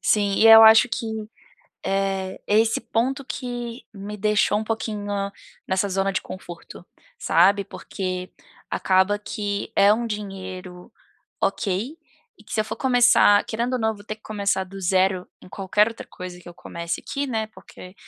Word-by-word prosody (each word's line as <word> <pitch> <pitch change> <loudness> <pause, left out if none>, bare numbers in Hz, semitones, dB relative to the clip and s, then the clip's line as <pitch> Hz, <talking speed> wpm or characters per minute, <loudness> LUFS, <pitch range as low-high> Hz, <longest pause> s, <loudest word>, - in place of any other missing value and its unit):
Sim, 205 -2 +2
e 225 - +4
eu 225 0 +10
acho 220 +2 +8
que, 230 - -3 0.8
eh, 195 -1 -1
esse 220 +2 +3
ponto 265 +4 -1
que 245 -2 -6
me 205 +1 -7
deixou 210 0 +2
um - - -3
pouquinho 215 -2 -4 0.6
nessa 190 +1 0
zona 195 +1 0
de - - -1
conforto, 175 -1 -10 0.3
sabe. 195 +5 +3
Porque 185 -2 -5 0.4
acaba 190 +2 +2
que 205 -1 -4
é 200 +1 +6
um 235 +2 -2
dinheiro 185 -4 -7 0.5
ok, 210 - -1 0.4
e - - -18
que - - -10
se 215 - +2
eu - - -5
for - - -6
começar, 245 -5 +5
querendo 235 +3 -2
ou 255 - 0
não 220 -1 +1
vou 205 - -15
ter 215 - -5
que 215 - -32
começar 200 -3 -1
do 195 +1 -10
zero, 185 0 +1
em - - -15
qualquer 205 +3 +1
outra 230 - -10
coisa 180 -1 -9
que 175 - -16
eu 175 - -10
comece 170 0 -5
aqui, 280 0 -3
né, 220 -4 -2
porque 185 -3 -14
205 Hz, 165 wpm, -23 LUFS, 190-225 Hz, 0.8 s, eu